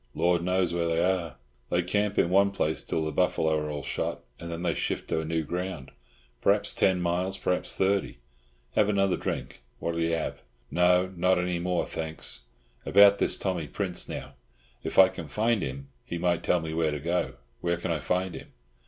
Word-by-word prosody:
Lord 85 -1 +2
knows 90 -1 +1
where 85 -1 0
they 85 +1 +1
are. 90 -3 0 0.3
They 90 0 +2
camp 105 +3 0
in 85 - +3
one 100 +1 +5
place 80 -5 -1
till 80 - -2
the 80 - -2
buffalo 80 -3 +2
are 75 0 -1
all 75 -1 -4
shot, - - -3 0.2
and 85 0 -6
then 85 +1 -4
they 90 - +1
shift - - -2
to 80 - 0
new 80 0 -1
ground. 90 -2 -4 0.5
Perhaps - - +2
ten 95 -1 +3
miles, 90 +2 0
perhaps 90 -1 -1
thirty. 95 -7 +1 0.6
Have 105 -1 +3
another 100 -2 +2
drink? - - -4 0.2
What'll 85 0 -2
you 85 0 +1
have?" 80 - -2 0.3
"No, 90 +1 +3
not 90 +2 +3
any 90 -1 0
more, 90 0 0
thanks. 80 -6 -4 0.4
About 100 +1 +6
this - - +2
Tommy 90 -5 -2
Prince, - - -3
now; 70 - -6 0.5
if - - -4
I 95 - +10
can 85 -3 -7
find 110 +6 +1
him 70 +1 -5
he 85 - -5
might 85 0 +1
tell 90 - +2
me 80 -1 -4
where 80 -1 +1
to 75 -1 -3
go. 85 +4 -1 0.3
Where 85 0 0
can 85 0 -3
I 80 - 0
find 90 +2 -1
him?" - - -10
85 Hz, 195 wpm, -28 LUFS, 80-95 Hz, 0.6 s, I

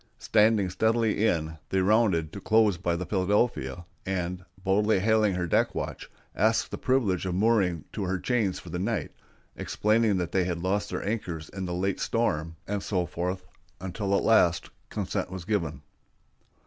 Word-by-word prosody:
Standing 105 -3 +3
steadily 110 +2 +1
in, 80 -4 -1
they 95 - +1
rounded 95 -5 +2
to 100 - -7
close 110 -3 +4
by 85 -1 -1
the 90 +2 -3
Philadelphia, 95 - 0 0.2
and, 90 -1 -3 0.2
boldly 105 +2 +3
hailing 105 -1 +3
her 90 -1 -1
deck 85 - +1
watch, - - -5 0.3
asked 110 +3 +2
the - - -4
privilege 105 -9 +1
of 90 - -2
mooring 95 -6 +2
to 100 - -3
her 95 +1 -1
chains 110 -3 0
for - - -10
the - - -3
night, - - -2 0.4
explaining 110 -1 +1
that 90 -2 -2
they 95 -2 +2
had 90 -2 -2
lost 100 +2 0
their - - -4
anchors 90 -8 -3
in 95 -1 -5
the 90 - -3
late 95 +2 -1
storm, 80 -8 -1
and 105 0 -2
so 90 -3 -1
forth, 90 +2 -3 0.3
until 95 +2 -1
at - - -1
last 90 -6 +3 0.2
consent - - -3
was 95 -2 -7
given. 85 -9 -2
95 Hz, 170 wpm, -27 LUFS, 90-110 Hz, 0.4 s, close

